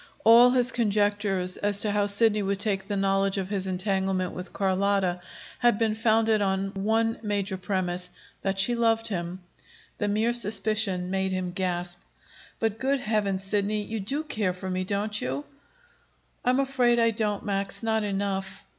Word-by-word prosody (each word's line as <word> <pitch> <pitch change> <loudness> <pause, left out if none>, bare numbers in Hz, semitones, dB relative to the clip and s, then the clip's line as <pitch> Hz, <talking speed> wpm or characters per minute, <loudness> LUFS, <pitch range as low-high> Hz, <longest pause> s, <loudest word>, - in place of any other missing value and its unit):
All 235 +2 +8
his 250 0 +2
conjectures 205 -4 0
as 205 0 +3
to 210 - +3
how 205 0 +1
Sidney 210 +1 +3
would 200 0 -1
take 195 -2 0
the 205 -2 -2
knowledge 195 0 +1
of 190 -1 -3
his 195 -2 -2
entanglement 190 -1 -1
with 180 +1 -7
Carlotta 190 -2 0 0.4
had 240 -3 +3
been 225 -1 +1
founded 220 -1 +2
on 195 0 0
one 225 +3 0
major 205 -2 -2
premise 180 -1 -2 0.3
that 195 0 -1
she 195 +5 +3
loved 225 -1 +1
him. 180 -1 -4 0.6
The 205 - 0
mere 220 +3 +1
suspicion 205 -4 +1
made 190 0 0
him 185 -1 -2
gasp. 175 -1 -2 0.6
"But, 225 -1 -1
good 275 +1 +1
Heavens, 205 -4 -1
Sidney, 205 +1 0
you 220 +2 -4
do 275 +10 -2
care 215 -11 -1
for 185 +1 -6
me, 185 0 -1
don't 210 +2 -1
you?" 135 +3 -3 1.0
"I'm 255 +1 +2
afraid 255 -3 +2
I 230 -1 +3
don't, 210 -2 -2
Max; 195 +1 -3
not 220 -1 +1
enough." 195 -1 -3
200 Hz, 165 wpm, -26 LUFS, 190-220 Hz, 1.0 s, All